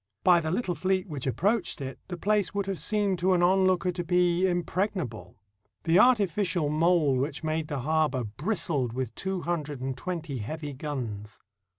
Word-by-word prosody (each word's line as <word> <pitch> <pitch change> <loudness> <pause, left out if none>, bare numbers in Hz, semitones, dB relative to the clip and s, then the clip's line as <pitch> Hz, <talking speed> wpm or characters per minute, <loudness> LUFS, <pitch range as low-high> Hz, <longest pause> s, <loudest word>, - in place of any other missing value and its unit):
By 180 -2 +6
the 160 -1 -3
little 185 +1 -1
fleet 185 +2 0
which 145 -6 -5
approached 185 - 0
it, 135 -1 -6
the 180 - -5
place 205 +1 +1
would 200 -1 0
have 195 -2 -3
seemed 205 -4 0
to 185 +2 +3
an 175 -1 +2
onlooker 185 0 +3
to 175 0 -4
be 180 +1 +2
impregnable. 175 - -2 0.5
The 165 +2 +4
artificial 200 -8 +3
mole 155 -3 +3
which 140 +4 -2
made 155 0 -1
the 145 -3 -3
harbor 155 -3 +1
bristled 140 - -2
with 130 -2 -3
two 190 -1 -3
hundred 155 -5 -3
and 130 0 -3
twenty 160 -3 -4
heavy 145 +6 -5
guns. 120 -8 -5
170 Hz, 170 wpm, -28 LUFS, 140-185 Hz, 0.5 s, By